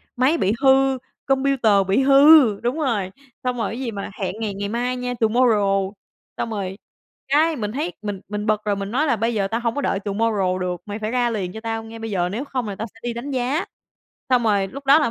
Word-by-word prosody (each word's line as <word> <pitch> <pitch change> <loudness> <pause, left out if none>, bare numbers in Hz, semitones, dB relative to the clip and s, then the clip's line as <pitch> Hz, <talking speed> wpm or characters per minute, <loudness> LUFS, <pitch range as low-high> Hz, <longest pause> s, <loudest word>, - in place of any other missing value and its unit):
Máy 265 +7 +3
bị 200 -4 +1
hư, 270 0 +4 0.3
computer 270 -4 +2 0.2
bị 195 +8 +3
hư 275 -5 +7
đúng 245 +6 -1
rồi, 210 -10 -1 0.3
xong 250 -1 -1
rồi 220 - -1
cái 235 - -5
gì 245 -4 -3
mà 200 0 -6
hẹn 190 0 -2
ngày 210 -3 -2
ngày 200 +1 -4
mai 245 +3 -1
nha, 250 0 -3
tomorrow. 210 -4 +2 0.5
Xong 230 - -2
rồi, 195 -3 -4 0.5
cái, 310 +3 +3
mình 210 -4 -3
thấy 300 +8 -2
mình 205 -2 -4
mình 210 0 -3
bực 215 -1 +1
rồi, 205 -1 +1
mình 200 +1 -5
nói 290 +6 +1
là 240 - +3
"Bây 230 +2 -1
giờ 200 -2 0
tao 225 +3 -2
hông 235 0 -1
có 285 - -1
đợi 195 - 0
tomorrow 200 -3 0
được, 180 -1 -3
mày 205 +1 -5
phải 215 +1 -3
ra 245 -1 +1
liền 195 -5 -3
cho 220 - -6
tao 225 -1 -3
ngay 225 0 -10
bây 225 -1 -5
giờ, 180 -2 0
nếu 235 +9 -4
không 255 -5 -3
là 200 - -4
tao 225 - -5
sẽ 225 - -18
đi 240 -1 -2
đánh 255 +5 -5
giá." 260 +6 0 0.7
Xong 250 -1 +4
rồi 200 -3 +2
lúc 275 +4 -10
đó 285 +3 +7
là 290 -7 +1
225 Hz, 240 wpm, -22 LUFS, 205-260 Hz, 0.7 s, hư